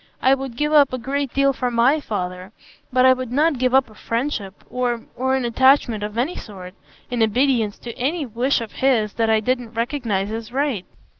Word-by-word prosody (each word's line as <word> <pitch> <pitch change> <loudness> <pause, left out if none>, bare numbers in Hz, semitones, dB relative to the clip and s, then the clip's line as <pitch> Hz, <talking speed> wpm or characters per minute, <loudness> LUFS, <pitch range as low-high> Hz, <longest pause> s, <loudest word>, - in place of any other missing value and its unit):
I 260 - +4
would 270 -3 -4
give 300 +2 0
up 285 -4 +5
a - - -1
great 270 +2 -2
deal 275 0 +2
for 250 -1 -2
my 245 +6 +3
father; 185 -6 -5 0.4
but 255 0 +4
I 260 - +7
would 255 -2 -5
not 295 +1 +2
give 255 0 +2
up 265 -1 +4
a 220 - -17
friendship 230 -4 -4
or—or 250 +1 -2
an 260 -2 -1
attachment 240 -2 +3
of 210 +1 -5
any 275 +9 0
sort, 185 -4 -9 0.4
in 245 -2 -1
obedience 225 -1 +2
to 235 -2 -8
any 295 +5 -1
wish 245 +3 0
of 225 - -6
his 230 -6 +1
that 225 -1 0
I 220 0 +4
didn't 245 0 -2
recognise 230 -5 -2
as 225 +1 -6
right." 265 -7 -1
245 Hz, 200 wpm, -21 LUFS, 220-270 Hz, 0.4 s, I